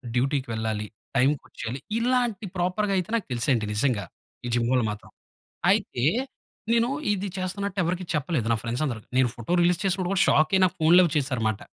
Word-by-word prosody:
డ్యూటీకి 135 +1 0
వెళ్ళాలి, 110 -1 -2 0.3
టైంకొచ్చేయాలి 130 -2 -1 0.2
ఇలాంటి 240 -4 0
ప్రాపర్‌గా 190 +3 0
అయితే 180 +2 -2
నాకు 220 - -2
తెలుసండి 120 -2 +1
నిజంగా 110 -2 +1 0.4
ఈ - - -2
జిమ్ 120 -1 +1
వల్ల 125 -2 +3
మాత్రం. 105 - -10 0.6
అయితే 120 - 0 0.7
నేను 235 +1 +3 0.2
ఇది 200 0 -1
చేస్తున్నట్టు 190 +1 -3
ఎవరికీ 180 +2 -1
చెప్పలేదు 145 -5 -1
నా 115 - +2
ఫ్రెండ్స్ 120 +5 -2
అందరికి. 115 -6 -5
నేను 130 -2 +4
ఫోటో 120 +7 -6
రిలీజ్ 175 +1 +3
చేసినప్పుడు 190 -1 0
కూడా 190 0 +4
షాక్ 155 +3 +4
అయి 190 - +3
నాకు 180 - -1
ఫోన్‌లవి 170 +1 +6
చేసారన్నమాట. 115 -7 -1
150 Hz, 165 wpm, -25 LUFS, 120-185 Hz, 0.7 s, ఫోన్‌లవి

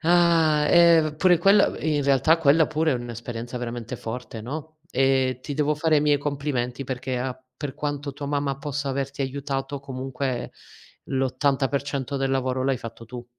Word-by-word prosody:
Ah, 165 -3 +4
eh, 165 -3 +5
pure 180 +1 +4
quella 200 +4 +4
in 150 -2 0
realtà 140 +4 +4
quella 160 0 +4
pure 155 0 +1
è - - +1
un'esperienza 120 0 -6
veramente 120 0 -5
forte, 115 0 -6
no, 155 +7 -7
e 130 -2 +2
ti 145 - -5
devo 150 +1 +1
fare 155 +1 +2
i - - +4
miei 145 -1 +3
complimenti 140 -3 -2
perché 130 0 -3
a 130 0 -3 0.2
per 145 -2 -5
quanto 145 -1 -3
tua 145 +1 -6
mamma 140 -1 -1
possa 145 0 -3
averti 135 +1 -2
aiutato 135 +1 -3
comunque 130 -1 -4 0.5
l'80% 135 +1 -1
del 135 0 0
lavoro 130 -1 0
l'hai 135 -1 +1
fatto 115 -1 -9
tu. 120 +1 -8
140 Hz, 160 wpm, -24 LUFS, 130-150 Hz, 0.5 s, eh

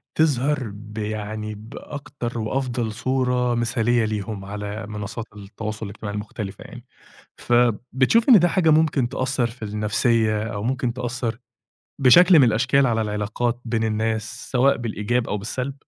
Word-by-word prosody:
تظهر 145 -2 +2
بيعني 105 0 -5
بأكتر 120 +2 -7
وأفضل 120 0 -2
صورة 125 0 0
مثالية 120 0 +1
ليهم 105 -1 -4
على 105 +2 -5
منصات 105 +1 -5
التواصل 105 +2 -6
الاجتماعي 105 0 -6
المختلفة 105 -1 -6
يعني. 120 0 -12 0.5
فبتشوف 125 - +2
إن 240 -5 +9
ده 175 0 +3
حاجة 170 -2 +3
ممكن 150 -5 +3
تأثر 130 0 -1
في 115 0 -11
النفسية 110 +1 +1
أو 105 -2 -4
ممكن 125 0 -1
تأثر 120 -1 -3 0.6
بشكل 170 +7 +7
من 135 - +7
الأشكال 125 +5 +3
على 115 -1 +1
العلاقات 110 +3 -2
بين 115 -1 -1
الناس 110 +1 -2
سواء 135 +2 +3
بالإيجاب 115 +1 -1
أو 105 - -1
بالسلب؟ 125 +6 -4
115 Hz, 130 wpm, -23 LUFS, 105-125 Hz, 0.6 s, إن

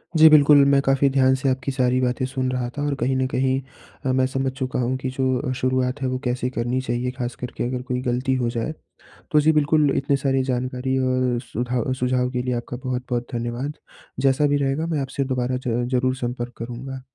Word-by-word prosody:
जी, 160 0 +8
बिल्कुल, 145 -1 +7
मैं 140 0 +4
काफ़ी 135 0 +3
ध्यान 130 -1 +4
से 130 +1 0
आपकी 130 0 -1
सारी 130 -1 +1
बातें 125 +1 0
सुन 130 0 -2
रहा 125 -1 -2
था - - -2
और 145 - 0
कहीं 130 +3 +1
न 130 - +1
कहीं 130 0 +1 0.5
अ, 130 - +2
मैं 130 0 +3
समझ 135 0 -1
चुका 130 -1 -3
हूँ 125 +1 0
कि 130 0 -3
जो 130 - +1 0.2
अ, - - 0
शुरुआत 130 +1 0
है 130 - 0
वो 130 0 -2
कैसे 125 0 -1
करनी 125 0 -1
चाहिए, 125 0 -2
ख़ास 125 -1 -4
कर 125 - -4
के - - -1
अगर 125 0 -3
कोई 125 0 -3
गलती 125 +1 0
हो 125 -2 0
जाए। 115 +6 -3 0.6
तो 150 - +5
जी, 155 +2 +4
बिल्कुल, 150 -1 +3
इतने 140 +1 +1
सारी 135 -1 +1
जानकारी 130 0 -1
और 130 -1 +1
सुधा 120 +1 -2
सुझाव 125 0 +1
के 125 -1 -1
लिए 125 0 -1
आपका 120 +1 -5
बहुत-बहुत 125 -1 -2
धन्यवाद, 120 +4 -3 0.5
जैसा 135 +2 +3
भी 145 0 +2
रहेगा 140 +3 0
मैं 160 -3 -1
आपसे 135 +1 -2
दोबारा 125 0 -1
ज़ 120 +1 0
ज़रूर 130 +1 +1
संपर्क 120 -1 -4
करूँगा। 125 +3 -6
130 Hz, 215 wpm, -23 LUFS, 125-135 Hz, 0.6 s, जी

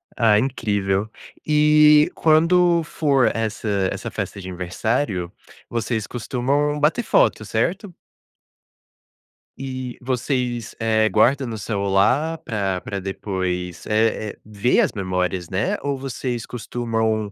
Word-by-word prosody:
Ah, 110 -3 +4
incrível. 105 -5 -1 0.4
Eh, 150 0 +5
quando 170 +2 +4
for 140 -4 +2
essa 110 -1 -3 0.2
essa - - -5
festa 100 - -5
de 95 - -8
aniversário, 95 +1 -2 0.4
vocês 115 -2 -2
costumam 135 +5 -1
bater 155 +11 +2
foto, - - +2
certo? 190 +1 -2 1.7
E, 130 -2 -5
vocês, 125 -2 -2
eh, 110 -1 +2
guardam 130 +5 +3
no 115 -1 -5
celular 105 +10 +1
pra 100 -4 -1
pra 100 +2 -5
depois, 90 -2 -4
eh 110 -1 +1
eh, - - -35
ver 105 +3 +2
as - - +1
memórias, 90 -3 -2
né. 95 +3 0
Ou 140 -1 -2
vocês 130 -3 -4
costumam, 110 -3 -2
115 Hz, 115 wpm, -22 LUFS, 100-140 Hz, 1.7 s, Eh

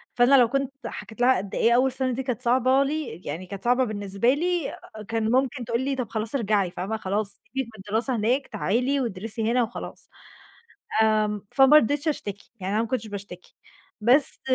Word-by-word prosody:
فأنا 245 +3 +5
لو 245 - +6
كنت 275 0 -1 0.2
حكيت 220 +3 -8
لها 255 +1 +5
قد 195 +1 -5
إيه 230 - +3
أول 260 +2 +3
سَنة 260 0 -1
دي 265 +2 -3
كانت 250 -2 -3
صعبة 255 +2 +3
لي، 275 - -4
يعني 165 +6 -5
كانت 195 +1 -8
صعبة 250 +2 +3
بالنسبة 205 +2 0
لي، 345 +1 -1 0.3
كان 225 0 -1
ممكن 255 -1 +1
تقول 230 +3 -1
لي: 270 0 -1
"طَب 245 -4 -4
خلاص 220 +3 -3
ارجعي." 205 -6 +1
فاهمة، 195 +6 -3
"خلاص 205 0 -1
سيبِك 265 -1 -5
من 195 - -11
الدراسة 235 +5 0
هناك 245 +6 0
تعالي 245 +6 0
وادرسي 225 +1 -3
هنا 245 0 +3
وخلاص." 225 - -7 0.9
آمم، 210 -2 +1
فما 270 +2 +7
رضيتش 290 +3 +3
أشتكي، 205 -9 -5
يعني 190 +2 -2
أنا 220 - +2
ما 230 - -4
كنتش 230 -3 -2
باشتكي. 200 -3 -9 0.5
بس 255 +6 +3
235 Hz, 185 wpm, -25 LUFS, 210-265 Hz, 0.9 s, فما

